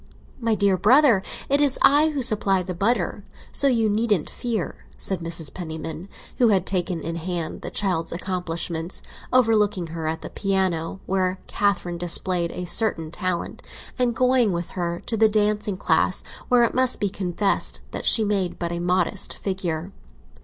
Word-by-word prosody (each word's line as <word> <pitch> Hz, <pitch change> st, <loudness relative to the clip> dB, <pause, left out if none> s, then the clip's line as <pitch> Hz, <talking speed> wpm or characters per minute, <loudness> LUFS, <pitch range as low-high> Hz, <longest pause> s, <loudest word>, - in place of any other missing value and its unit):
My 230 Hz, -2 st, +1 dB
dear 200 Hz, -2 st, +2 dB
brother, 245 Hz, -1 st, +5 dB, 0.3 s
it 280 Hz, +1 st, +2 dB
is 280 Hz, -2 st, +4 dB
I 295 Hz, +3 st, +6 dB
who 285 Hz, -4 st, -1 dB
supply 205 Hz, -5 st, +3 dB
the 180 Hz, +1 st, -5 dB
butter; 200 Hz, +1 st, 0 dB, 0.3 s
so 280 Hz, -, +4 dB
you 230 Hz, -4 st, +2 dB
needn't 210 Hz, -4 st, 0 dB
fear!" 225 Hz, -7 st, -4 dB
said 190 Hz, -3 st, -2 dB
Mrs. 165 Hz, -4 st, -2 dB
Penniman, 160 Hz, +1 st, -6 dB, 0.3 s
who 245 Hz, -, +5 dB
had 195 Hz, -4 st, +2 dB
taken 180 Hz, -3 st, -2 dB
in 165 Hz, +2 st, -4 dB
hand 170 Hz, -1 st, -4 dB
the -, -, -5 dB
child's 180 Hz, -5 st, -1 dB
accomplishments, 170 Hz, -1 st, -3 dB, 0.3 s
overlooking 215 Hz, -7 st, +3 dB
her 165 Hz, -1 st, -4 dB
at 160 Hz, +1 st, -3 dB
the -, -, -8 dB
piano, 190 Hz, -3 st, -1 dB
where 185 Hz, -1 st, 0 dB
Catherine 180 Hz, -4 st, -1 dB
displayed 175 Hz, 0 st, +1 dB
a 180 Hz, -, -5 dB
certain 170 Hz, -5 st, 0 dB
talent, 180 Hz, 0 st, -3 dB, 0.4 s
and 245 Hz, -2 st, +1 dB
going 250 Hz, -3 st, +3 dB
with 170 Hz, -1 st, -3 dB
her 170 Hz, -1 st, -4 dB
to 230 Hz, -, -1 dB
the 220 Hz, 0 st, +4 dB
dancing 210 Hz, -2 st, +1 dB
class, -, -, +1 dB, 0.3 s
where 245 Hz, -1 st, +5 dB
it 235 Hz, -, +1 dB
must 255 Hz, 0 st, +3 dB
be 205 Hz, -, +1 dB
confessed 195 Hz, +1 st, -1 dB
that -, -, -2 dB
she 220 Hz, -, +6 dB
made 195 Hz, -3 st, -1 dB
but 170 Hz, -1 st, -3 dB
a 170 Hz, -, -3 dB
modest 180 Hz, +2 st, 0 dB
figure. 185 Hz, -2 st, -3 dB
190 Hz, 165 wpm, -23 LUFS, 175-220 Hz, 0.4 s, I